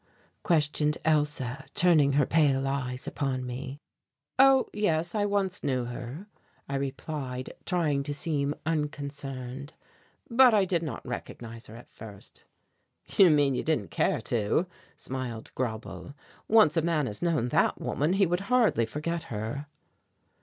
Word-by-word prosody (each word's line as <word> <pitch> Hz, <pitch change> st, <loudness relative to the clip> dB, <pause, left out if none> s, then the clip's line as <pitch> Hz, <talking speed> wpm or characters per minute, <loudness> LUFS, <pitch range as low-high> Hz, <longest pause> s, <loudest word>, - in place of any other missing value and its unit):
questioned 150 Hz, -3 st, +2 dB
Elsa, 145 Hz, -4 st, +1 dB
turning 155 Hz, -6 st, +4 dB
her 145 Hz, -1 st, +4 dB
pale 140 Hz, -3 st, +2 dB
eyes 130 Hz, -2 st, -3 dB
upon 130 Hz, -3 st, -2 dB
me. 130 Hz, +2 st, -6 dB, 0.6 s
"Oh, 270 Hz, -1 st, +6 dB
yes, 170 Hz, -5 st, 0 dB
I 210 Hz, -1 st, +1 dB
once 200 Hz, -2 st, -1 dB
knew 130 Hz, -3 st, 0 dB
her," 125 Hz, +8 st, -7 dB, 0.4 s
I 140 Hz, -, -5 dB
replied, 135 Hz, -1 st, -4 dB
trying 160 Hz, -6 st, +1 dB
to 145 Hz, +1 st, -3 dB
seem 145 Hz, -1 st, -1 dB
unconcerned; 140 Hz, -3 st, -4 dB, 0.5 s
"but 245 Hz, -1 st, +6 dB
I 200 Hz, -2 st, +4 dB
did 175 Hz, -3 st, 0 dB
not 150 Hz, -9 st, -5 dB
recognize 115 Hz, -1 st, -7 dB
her 110 Hz, -, -11 dB
at 120 Hz, -, -13 dB
first." 105 Hz, -3 st, -11 dB, 0.6 s
"You 190 Hz, -3 st, +6 dB
mean 145 Hz, -3 st, +4 dB
you -, -, -1 dB
didn't 120 Hz, -, -1 dB
care -, -, +1 dB
to," 115 Hz, -, +1 dB, 0.3 s
smiled 125 Hz, -4 st, -5 dB
Grauble. 125 Hz, +3 st, -5 dB, 0.3 s
"Once 215 Hz, -8 st, +5 dB
a 165 Hz, -, +3 dB
man 160 Hz, -3 st, +1 dB
had 105 Hz, -4 st, -5 dB
known 160 Hz, -8 st, +1 dB
that -, -, +2 dB
woman 150 Hz, +5 st, 0 dB
he 195 Hz, 0 st, +4 dB
would 175 Hz, +1 st, 0 dB
hardly 230 Hz, -, +3 dB
forget 165 Hz, +7 st, -3 dB
her." 115 Hz, +7 st, -4 dB
145 Hz, 140 wpm, -28 LUFS, 130-165 Hz, 0.6 s, Oh